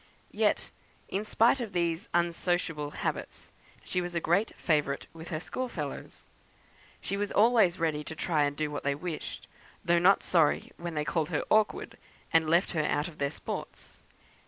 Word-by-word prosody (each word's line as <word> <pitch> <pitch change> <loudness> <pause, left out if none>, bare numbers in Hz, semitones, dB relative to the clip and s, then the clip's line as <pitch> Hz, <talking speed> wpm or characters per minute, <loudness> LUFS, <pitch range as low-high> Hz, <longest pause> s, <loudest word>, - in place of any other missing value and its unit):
Yet, - - +1 0.4
in 195 +2 -1
spite 230 +4 +3
of 220 -4 -5
these 170 +3 -1
unsociable 170 -3 0
habits, - - -4 0.3
she 180 - -1
was 175 0 -5
a - - +2
great 185 +7 +1
favourite 150 -4 0
with 165 0 -9
her 155 -4 -2
school 255 +9 -4
fellows. 150 -9 -6 0.8
She 200 - -3
was 205 0 -2
always 215 -5 +4
ready 155 -2 0
to 160 - -6
try 155 -2 +1
and 145 0 -3
do 155 -1 -1
what 145 - -3
they 140 0 +1
wished, 165 +1 -6 0.4
though 170 0 +4
not 190 +3 +5
sorry 165 -4 +2
when 170 -1 -5
they 150 0 -1
called 160 -2 0
her - - 0
awkward, 215 -1 +2 0.3
and 160 -1 +4
left 170 +4 +3
her 155 -3 0
out 150 +1 0
of 165 -3 -12
their 140 0 +1
sports. - - -7
170 Hz, 175 wpm, -29 LUFS, 150-185 Hz, 0.8 s, not